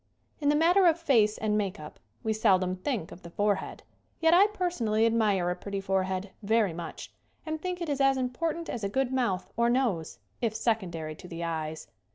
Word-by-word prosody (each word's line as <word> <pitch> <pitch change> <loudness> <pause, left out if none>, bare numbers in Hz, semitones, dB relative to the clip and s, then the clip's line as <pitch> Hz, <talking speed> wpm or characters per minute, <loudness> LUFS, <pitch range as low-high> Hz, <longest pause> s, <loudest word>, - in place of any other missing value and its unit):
IN 290 -2 +1
THE 295 - +4
MATTER 350 +4 +5
of 335 0 +3
face 225 -10 +3
and 215 -1 0
make 200 -5 -1
up 150 0 -10 0.2
we 220 - +1
sel 215 -3 +4
dom 185 0 -2
think 190 - -3
of 175 - -11
the 170 - -10
forehead. 205 +3 -1 0.4
Yet 325 0 +4
I 385 +4 +7
personally 300 - 0
admire 210 -6 +2
a - - -2
pretty 200 +1 -5
forehead 190 0 -1
very 215 -3 +2
much 170 0 -7 0.3
and 315 -1 -4
think 360 0 -3
it 340 - -2
is 285 -2 -1
as 270 0 +4
important 325 +7 -2
as 230 - -5
a 200 - 0
good 265 +4 0
mouth 205 -8 -1
or 235 +1 +2
nose, 235 - 0 0.2
if 225 -3 0
secondary 180 -9 -1
to - - -11
the 170 -1 -6
eyes. 160 -1 -4
220 Hz, 205 wpm, -28 LUFS, 185-275 Hz, 0.4 s, I